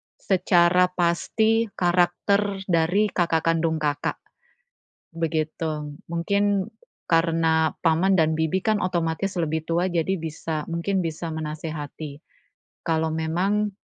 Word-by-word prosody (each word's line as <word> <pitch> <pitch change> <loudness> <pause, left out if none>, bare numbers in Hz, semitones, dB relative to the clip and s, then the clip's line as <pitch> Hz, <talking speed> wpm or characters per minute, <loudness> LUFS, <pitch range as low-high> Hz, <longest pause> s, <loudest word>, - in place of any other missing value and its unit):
secara 180 -1 +3
pasti 220 +6 +1
karakter 190 +3 +1
dari 180 +4 +2
kakak 165 -2 +1
kandung 165 -1 +2
Kakak, 145 -1 -1 0.9
begitu. 155 -2 -3
Mungkin, 200 +4 0 0.4
karena 165 -1 +2
paman 170 +4 +3
dan 160 -2 +3
bibi 160 +4 +1
kan 215 -2 +2
otomatis 175 +2 -1
lebih 160 -1 -1
tua, 170 +2 +1
jadi 175 +2 0
bisa 155 -1 -4
mungkin 170 +3 -1
bisa 165 +1 -4
menasehati. 155 -1 -6 0.7
Kalau 160 -1 +1
memang 185 +6 0
165 Hz, 105 wpm, -24 LUFS, 160-185 Hz, 0.9 s, secara